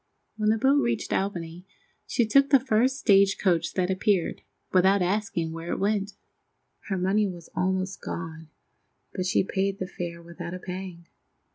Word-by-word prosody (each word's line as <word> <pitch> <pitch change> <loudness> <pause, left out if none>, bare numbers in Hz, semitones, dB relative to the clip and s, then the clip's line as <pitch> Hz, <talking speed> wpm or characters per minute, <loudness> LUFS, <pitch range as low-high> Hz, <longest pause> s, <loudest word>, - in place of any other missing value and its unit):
When 215 -1 +1
the 220 - +3
boat 275 +5 +3
reached 235 -3 -1
Albany 175 -3 -3 0.4
she 235 - +1
took 275 +6 +4
the 275 - +6
first 255 +1 +2
stagecoach 195 - +3
that 185 0 +1
appeared, 190 -2 0 0.3
without 190 +1 +4
asking 190 -3 -1
where 165 +1 -6
it - - -1
went. 200 0 0 0.7
Her 195 - -1
money 195 +3 +2
was 175 -3 -9
almost 190 +1 -1
gone, 160 -1 -6 0.6
but 185 -1 -2
she 185 - +2
paid 195 +1 -1
the 185 - -3
fare 175 -2 -6
without 170 +1 -7
a - - -7
pang. 180 -2 -7
190 Hz, 155 wpm, -26 LUFS, 175-210 Hz, 0.7 s, the